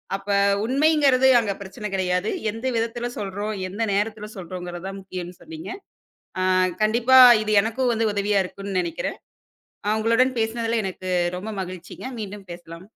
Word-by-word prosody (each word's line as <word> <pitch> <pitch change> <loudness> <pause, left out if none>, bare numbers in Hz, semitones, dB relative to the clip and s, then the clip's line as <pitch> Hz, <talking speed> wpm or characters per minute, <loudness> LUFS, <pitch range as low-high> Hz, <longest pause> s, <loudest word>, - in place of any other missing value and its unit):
அப்ப 195 +1 -8 0.4
உண்மைங்குறது 275 -1 +4
அங்க 210 -3 -1
பிரச்சன 210 +2 -6
கிடையாது. 185 +1 0 0.2
எந்த 225 +4 -5
விதத்தில 235 +1 -2
சொல்றோம், 205 +1 -3 0.2
எந்த 205 +4 -6
நேரத்துல 210 +1 -2
சொல்றோம்கிறது 175 0 -7
தான் 195 0 -6
முக்கியம்ன்னு 180 -2 -8
சொன்னீங்க. 320 +1 -9 0.9
அ - - +3 0.3
கண்டிப்பா 240 +4 +5 0.2
இது 215 0 -1
எனக்கும் 240 +2 0
வந்து 225 0 +1
உதவியா 205 0 +1
இருக்கும்ன்னு 195 0 -4
நெனைக்கிறேன். 170 -2 -4 0.7
அ - - +2
உங்களுடன் 230 +4 +3
பேசினதுல 230 +1 0
எனக்கு 185 -1 -5 0.3
ரொம்ப 210 +4 -6
மகிழ்ச்சிங்க, 180 +3 -9 0.2
மீண்டும் 200 -1 -8
பேசலாம். 170 0 -11
210 Hz, 140 wpm, -23 LUFS, 185-230 Hz, 0.9 s, கண்டிப்பா